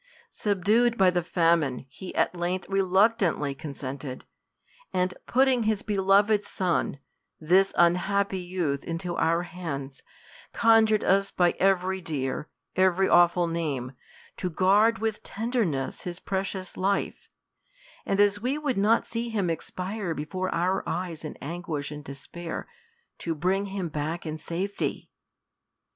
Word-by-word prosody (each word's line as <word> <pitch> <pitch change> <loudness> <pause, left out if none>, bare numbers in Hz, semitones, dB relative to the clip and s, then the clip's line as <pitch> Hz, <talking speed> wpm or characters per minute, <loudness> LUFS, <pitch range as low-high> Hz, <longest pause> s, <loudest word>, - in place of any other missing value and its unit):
Subdued 215 +4 +2
by 190 -1 +5
the 175 -1 +1
famine, 165 -7 +1
he 185 +7 -9
at - - +2
length 180 +2 -2
reluctantly 195 -5 +2
con 140 +1 -8
sented; 130 0 -6 0.7
and 185 0 0
putting 260 -1 +3
his 215 -2 0
beloved 205 +1 +3
son, 180 -7 -1 0.4
this 185 +5 +4
unhappy 190 +3 +2
youth, 175 -6 -2
into 170 +1 -4
our 170 +1 +2
hands, 140 -7 -6 0.5
conjured 225 -2 +4
us 195 +1 +3
by 175 -1 +3
every 190 0 +2
dear, 150 -3 -3 0.3
every 190 0 +3
avv'ful 175 -1 +4
name, 145 -7 -2 0.5
to 180 - -2
guard 205 +6 +4
with 220 -1 -2
tenderness 215 - -2
his 175 0 -6
pre 190 0 -1
cious 190 -2 -6
life; 195 +1 -1 0.7
and 195 - -1
as 205 0 +4
we 260 +5 0
would 285 -8 -1
not 215 +3 +3
see 235 +1 -3
him 200 -6 0
expire 180 +2 -4
before 185 +6 -3
our 185 +3 0
eyes 175 -3 -4
in 155 - -7
anguish 155 -2 -4
and 150 0 -7
despair, 160 +5 -7 0.5
to 165 -1 -2
bring 190 +5 0
him 190 -2 -3
back 155 +3 -3
in 155 0 -4
safety. 185 +6 -3
185 Hz, 135 wpm, -27 LUFS, 165-200 Hz, 0.7 s, by